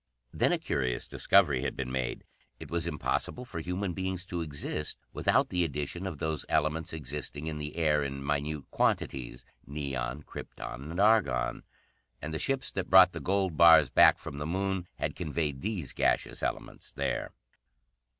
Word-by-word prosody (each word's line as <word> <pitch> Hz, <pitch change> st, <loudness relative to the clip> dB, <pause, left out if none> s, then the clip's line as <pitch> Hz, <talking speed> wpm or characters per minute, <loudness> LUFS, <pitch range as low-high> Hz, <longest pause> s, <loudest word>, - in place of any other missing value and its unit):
Then -, -, +2 dB
a -, -, +3 dB
curious 65 Hz, -3 st, -2 dB
discovery 65 Hz, -, +3 dB
had -, -, -2 dB
been 65 Hz, -2 st, -4 dB
made. 65 Hz, 0 st, -2 dB, 0.4 s
It -, -, -10 dB
was 85 Hz, -1 st, -1 dB
impossible 85 Hz, +9 st, -2 dB
for 85 Hz, -, -6 dB
human 90 Hz, +3 st, -2 dB
beings 95 Hz, 0 st, -3 dB
to 85 Hz, -2 st, -3 dB
exist 75 Hz, 0 st, -3 dB, 0.2 s
without -, -, +2 dB
the 90 Hz, -1 st, +1 dB
addition 80 Hz, +4 st, -3 dB
of 90 Hz, -6 st, -5 dB
those 80 Hz, -1 st, -2 dB
elements 80 Hz, +3 st, 0 dB
existing 75 Hz, 0 st, -5 dB
in 80 Hz, -1 st, -4 dB
the 75 Hz, 0 st, -5 dB
air 75 Hz, -3 st, +2 dB
in 70 Hz, 0 st, -4 dB
minute 75 Hz, 0 st, -1 dB
quantities 60 Hz, -1 st, -1 dB, 0.2 s
neon, 70 Hz, 0 st, -3 dB
krypton, 65 Hz, +2 st, -8 dB
and 85 Hz, +3 st, -4 dB
argon. 105 Hz, -, +3 dB, 0.6 s
And 80 Hz, +2 st, -5 dB
the 80 Hz, -, -2 dB
ships 135 Hz, -1 st, 0 dB
that 95 Hz, -2 st, -3 dB
brought 95 Hz, -1 st, +8 dB
the -, -, -6 dB
gold 95 Hz, -4 st, 0 dB
bars 85 Hz, -1 st, +8 dB
back -, -, +7 dB
from 70 Hz, -, -8 dB
the 75 Hz, -, -3 dB
Moon 95 Hz, +1 st, -1 dB
had -, -, -3 dB
conveyed 75 Hz, -3 st, -2 dB
these 100 Hz, -, -3 dB
gaseous -, -, 0 dB
elements -, -, -4 dB
there. -, -, -2 dB
80 Hz, 165 wpm, -30 LUFS, 70-90 Hz, 0.6 s, brought